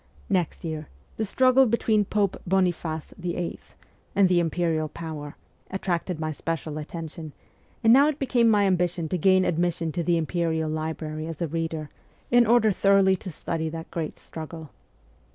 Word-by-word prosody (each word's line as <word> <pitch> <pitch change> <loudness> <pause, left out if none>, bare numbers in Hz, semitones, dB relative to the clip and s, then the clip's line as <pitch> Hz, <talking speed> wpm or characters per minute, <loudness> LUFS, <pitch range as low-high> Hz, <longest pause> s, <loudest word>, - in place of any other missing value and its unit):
Next 180 -3 0
year 155 -2 -4 0.3
the 220 - 0
struggle 255 +4 +4
between 220 -2 +2
Pope 200 -1 0
Boniface 175 -4 0
VIII, 175 -1 -3 0.6
and 200 -2 +5
the 180 -1 +3
Imperial 165 -2 0
power 155 -3 -7 0.3
attracted 180 -2 -2
my 155 0 -2
special 155 0 -4
attention, 160 0 -7 0.5
and 225 0 +7
now 280 +3 +7
it 305 -2 0
became 245 -4 +3
my 205 -2 +4
ambition 175 -3 +1
to 180 - 0
gain 185 +2 +4
admission 170 -1 0
to 175 - -2
the 170 0 +2
Imperial 160 -1 -1
library 155 0 -4
as 165 -2 -6
a 170 - -1
reader, 160 -1 -3 0.4
in 240 -1 +5
order 225 -2 +5
thoroughly 195 0 +4
to 185 - -7
study 160 0 -3
that 165 +1 -7
great 160 -2 -4
struggle. 160 -1 -9
170 Hz, 155 wpm, -26 LUFS, 160-195 Hz, 0.6 s, and